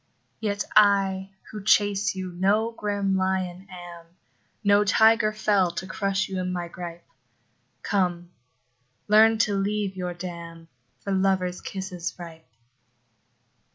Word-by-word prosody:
Yet 205 Hz, -3 st, -1 dB
I, 195 Hz, -2 st, +4 dB, 0.2 s
who 210 Hz, -2 st, -7 dB
chase 205 Hz, 0 st, +2 dB
you, 185 Hz, -1 st, -5 dB
no 200 Hz, +6 st, +1 dB
grim 205 Hz, -3 st, -1 dB
lion 185 Hz, 0 st, -1 dB
am, 175 Hz, -2 st, -10 dB, 0.6 s
No 205 Hz, 0 st, +5 dB
tiger 220 Hz, +1 st, +4 dB
fell, 205 Hz, -4 st, +2 dB
to 185 Hz, -, -5 dB
crush 195 Hz, 0 st, -1 dB
you 190 Hz, -1 st, -4 dB
in 185 Hz, 0 st, -2 dB
my 175 Hz, -1 st, -3 dB
gripe: 170 Hz, -1 st, -8 dB, 0.8 s
Come, 175 Hz, -3 st, -1 dB, 0.8 s
learn 220 Hz, +1 st, +6 dB
to 205 Hz, -, -3 dB
leave 200 Hz, 0 st, -1 dB
your 180 Hz, -1 st, -4 dB
dam, 170 Hz, -2 st, -8 dB, 0.3 s
For 200 Hz, -, -4 dB
lover's 190 Hz, -2 st, 0 dB
kisses 190 Hz, -3 st, -5 dB
ripe. 165 Hz, -2 st, -11 dB
190 Hz, 120 wpm, -25 LUFS, 180-205 Hz, 0.8 s, learn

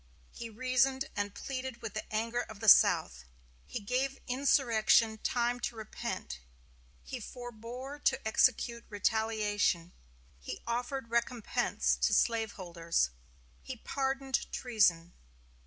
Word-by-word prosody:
He 235 Hz, -, -7 dB
reasoned 255 Hz, +3 st, +1 dB
and 205 Hz, 0 st, -2 dB
pleaded 260 Hz, -3 st, -5 dB
with 220 Hz, -3 st, -5 dB
the 215 Hz, -, -6 dB
anger 230 Hz, +3 st, 0 dB
of 215 Hz, -2 st, -9 dB
the 225 Hz, -, -4 dB
South; 195 Hz, -, +6 dB, 0.4 s
he -, -, -4 dB
gave 260 Hz, +6 st, -1 dB
insurrection 230 Hz, -4 st, +3 dB
time 245 Hz, +1 st, 0 dB
to 240 Hz, -, -3 dB
repent; 190 Hz, -, -5 dB, 0.6 s
he 255 Hz, -, -6 dB
forbore 245 Hz, +4 st, -8 dB
to 265 Hz, -4 st, +2 dB
execute 235 Hz, +1 st, +2 dB
retaliation; 205 Hz, -4 st, 0 dB, 0.5 s
he 65 Hz, -, -7 dB
offered 245 Hz, +1 st, -3 dB
recompense 235 Hz, -1 st, 0 dB
to -, -, +2 dB
slaveholders; 180 Hz, -, 0 dB, 0.5 s
he 260 Hz, -2 st, -7 dB
pardoned 270 Hz, +2 st, -2 dB
treason. 180 Hz, -8 st, +2 dB
235 Hz, 110 wpm, -32 LUFS, 215-255 Hz, 0.6 s, South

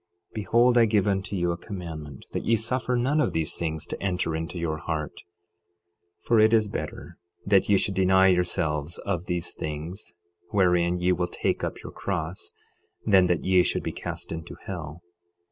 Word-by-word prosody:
12:29 -, -, -33 dB
Behold, 120 Hz, +4 st, +3 dB
I 115 Hz, -, +6 dB
give 105 Hz, -3 st, +2 dB
unto 100 Hz, 0 st, -1 dB
you 90 Hz, -2 st, +1 dB
a 85 Hz, -, -3 dB
commandment, 80 Hz, -, -8 dB
that -, -, -3 dB
ye 115 Hz, -, +3 dB
suffer 125 Hz, +3 st, 0 dB
none 135 Hz, +6 st, +2 dB
of -, -, 0 dB
these 80 Hz, -1 st, 0 dB
things 80 Hz, -2 st, -3 dB
to -, -, -6 dB
enter 90 Hz, -4 st, -1 dB
into 80 Hz, +2 st, -4 dB
your 80 Hz, -2 st, -2 dB
heart; 75 Hz, -2 st, -4 dB, 1.0 s
12:30 -, -, -24 dB
For 115 Hz, -2 st, +4 dB
it 110 Hz, +1 st, +5 dB
is 110 Hz, -2 st, +4 dB
better 80 Hz, -6 st, -6 dB, 0.3 s
that 100 Hz, -1 st, +3 dB
ye 100 Hz, -, +6 dB
should 100 Hz, +1 st, +1 dB
deny 95 Hz, 0 st, +4 dB
yourselves 85 Hz, -3 st, 0 dB
of 90 Hz, 0 st, -2 dB
these 90 Hz, -1 st, -2 dB
things, 80 Hz, +6 st, -5 dB, 0.4 s
wherein 90 Hz, -4 st, +3 dB
ye 90 Hz, +1 st, +2 dB
will 90 Hz, -1 st, 0 dB
take -, -, -2 dB
up -, -, -4 dB
your -, -, -7 dB
cross, 90 Hz, -2 st, -4 dB, 0.5 s
than 95 Hz, -4 st, +5 dB
that 90 Hz, -2 st, 0 dB
ye 95 Hz, -1 st, +5 dB
should -, -, 0 dB
be -, -, -2 dB
cast -, -, -6 dB
into 80 Hz, 0 st, -6 dB
hell. 85 Hz, -3 st, -6 dB
90 Hz, 185 wpm, -26 LUFS, 80-100 Hz, 1.0 s, I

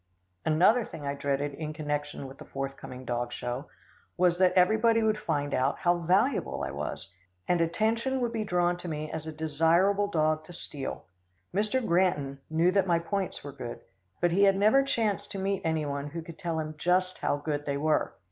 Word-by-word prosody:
Another 180 Hz, +10 st, +4 dB
thing 160 Hz, -7 st, -8 dB
I 140 Hz, -, -1 dB
dreaded 140 Hz, 0 st, -1 dB
in 155 Hz, +1 st, -5 dB
connection 145 Hz, -2 st, -3 dB
with 135 Hz, +1 st, -10 dB
the -, -, -8 dB
forthcoming 135 Hz, -1 st, -6 dB
dog 120 Hz, 0 st, -2 dB
show 125 Hz, +5 st, -4 dB, 0.5 s
was, 175 Hz, -1 st, +3 dB
that 185 Hz, -1 st, +5 dB
everybody 220 Hz, +5 st, +4 dB
would 215 Hz, -1 st, +2 dB
find 145 Hz, -5 st, -1 dB
out 130 Hz, +2 st, +1 dB
how 175 Hz, -1 st, +2 dB
valuable 195 Hz, -, +1 dB
I 65 Hz, -, -3 dB
was, 75 Hz, +4 st, -5 dB, 0.3 s
and 175 Hz, -1 st, +2 dB
attention 225 Hz, +9 st, +1 dB
would 240 Hz, -2 st, -1 dB
be 220 Hz, -1 st, -1 dB
drawn 175 Hz, -2 st, +1 dB
to 175 Hz, -, -8 dB
me 155 Hz, -1 st, -4 dB
as 160 Hz, 0 st, -5 dB
a -, -, -3 dB
desirable 165 Hz, +6 st, +2 dB
dog 155 Hz, -4 st, +1 dB
to 175 Hz, -, -11 dB
steal. 145 Hz, -5 st, -6 dB, 0.5 s
Mr. 215 Hz, +6 st, +1 dB
Granton 170 Hz, -7 st, +1 dB
knew 165 Hz, +3 st, +3 dB
that 195 Hz, -1 st, +2 dB
my 170 Hz, -1 st, +4 dB
points 190 Hz, +3 st, -3 dB
were 145 Hz, -, -6 dB
good, 130 Hz, -4 st, -7 dB, 0.4 s
but 175 Hz, -1 st, +2 dB
he 200 Hz, +4 st, +5 dB
had 195 Hz, -1 st, +5 dB
never 215 Hz, +7 st, +5 dB
chanced 215 Hz, -7 st, -1 dB
to -, -, -4 dB
meet 195 Hz, 0 st, -1 dB
any 160 Hz, -2 st, 0 dB
one 140 Hz, 0 st, -3 dB
who 165 Hz, +3 st, -6 dB
could 165 Hz, 0 st, -11 dB
tell 170 Hz, -3 st, -2 dB
him 155 Hz, 0 st, -4 dB
just 185 Hz, +2 st, +1 dB
how -, -, +1 dB
good 145 Hz, 0 st, -3 dB
they 140 Hz, 0 st, 0 dB
were. 155 Hz, +2 st, +1 dB
165 Hz, 195 wpm, -29 LUFS, 145-195 Hz, 0.5 s, that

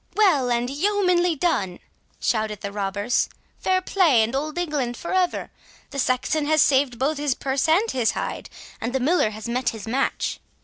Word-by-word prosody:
"Well 340 Hz, -12 st, +3 dB
and 240 Hz, 0 st, +1 dB
yeomanly 360 Hz, +3 st, +2 dB
done!" 205 Hz, -, 0 dB, 0.4 s
shouted 215 Hz, -2 st, -1 dB
the 200 Hz, -, -4 dB
robbers; 205 Hz, +3 st, 0 dB, 0.3 s
"fair 370 Hz, 0 st, +1 dB
play 330 Hz, -, +4 dB
and 225 Hz, +3 st, -2 dB
Old 305 Hz, +4 st, -3 dB
England 290 Hz, -8 st, -1 dB
for 340 Hz, -, -5 dB
ever! 370 Hz, -1 st, 0 dB, 0.4 s
The 280 Hz, -, -4 dB
Saxon 270 Hz, +4 st, 0 dB
hath 310 Hz, -1 st, +4 dB
saved 265 Hz, -3 st, +3 dB
both 280 Hz, +4 st, 0 dB
his 290 Hz, -3 st, 0 dB
purse 270 Hz, +2 st, -1 dB
and 390 Hz, +8 st, +3 dB
his 245 Hz, -4 st, +1 dB
hide, -, -, -4 dB, 0.3 s
and 230 Hz, +2 st, -3 dB
the 265 Hz, -, +1 dB
Miller 290 Hz, -2 st, +2 dB
has 215 Hz, +1 st, -7 dB
met 240 Hz, 0 st, 0 dB
his 220 Hz, -2 st, -8 dB
match." 265 Hz, +4 st, -1 dB
270 Hz, 175 wpm, -23 LUFS, 235-330 Hz, 0.4 s, play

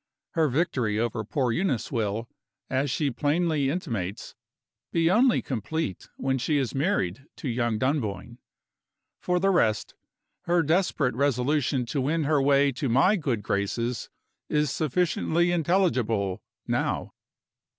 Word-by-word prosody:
Her 160 Hz, -3 st, +2 dB
victory 125 Hz, -7 st, 0 dB
over 115 Hz, 0 st, -1 dB
poor 125 Hz, +3 st, 0 dB
Eunice 130 Hz, -, -1 dB
will, 110 Hz, -1 st, -1 dB, 0.4 s
as 135 Hz, +2 st, +1 dB
she 140 Hz, +2 st, 0 dB
plainly 150 Hz, +2 st, +1 dB
intimates, 115 Hz, -, -4 dB, 0.6 s
be 165 Hz, 0 st, +2 dB
only 240 Hz, +5 st, +4 dB
complete 130 Hz, -, -3 dB
when 135 Hz, 0 st, 0 dB
she 145 Hz, +4 st, +1 dB
is 135 Hz, -4 st, -1 dB
married 135 Hz, -, -1 dB
to -, -, -6 dB
young 120 Hz, -2 st, 0 dB
Dunboyne. 120 Hz, -2 st, -2 dB, 0.8 s
For 180 Hz, 0 st, 0 dB
the 195 Hz, +2 st, +3 dB
rest, 110 Hz, -, +1 dB, 0.5 s
her 170 Hz, -1 st, +3 dB
desperate 160 Hz, -5 st, +1 dB
resolution 135 Hz, 0 st, +1 dB
to 135 Hz, +4 st, -2 dB
win 155 Hz, +5 st, 0 dB
her 145 Hz, -1 st, +2 dB
way 140 Hz, 0 st, +4 dB
to 135 Hz, +1 st, -3 dB
my 140 Hz, -, +4 dB
good 130 Hz, -, -2 dB
graces 115 Hz, +5 st, -2 dB, 0.4 s
is 150 Hz, -2 st, +1 dB
sufficiently 170 Hz, +3 st, +1 dB
intelligible, 130 Hz, -, +1 dB, 0.2 s
now. -, -, -1 dB
140 Hz, 130 wpm, -26 LUFS, 120-160 Hz, 0.8 s, only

